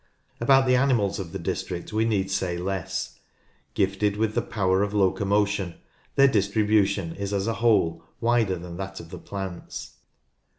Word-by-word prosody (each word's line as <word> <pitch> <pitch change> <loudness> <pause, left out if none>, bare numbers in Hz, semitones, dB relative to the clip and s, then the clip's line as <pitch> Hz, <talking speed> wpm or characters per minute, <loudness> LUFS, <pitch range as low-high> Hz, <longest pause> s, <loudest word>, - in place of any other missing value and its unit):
About 135 +2 +5
the 125 0 +4
animals 120 -7 +2
of 90 -4 -5
the - - -4
district 90 +3 -4
we 110 +1 +2
need 100 -4 0
say 95 -2 -1
less. 95 +1 -3 0.6
Gifted 100 +1 +1
with 110 +2 -1
power 95 -2 +2
of 105 0 -1
locomotion, 100 -1 +1 0.4
their 140 0 +7
distribution 100 -4 +2
is 100 0 -3
as 100 0 0
a 115 - 0
whole 85 -8 +3 0.2
wider 115 -5 +2
than 85 0 -8
that 95 0 -6
of 85 -1 -11
the - - -7
plants. 95 -3 -7
100 Hz, 155 wpm, -25 LUFS, 95-110 Hz, 0.6 s, their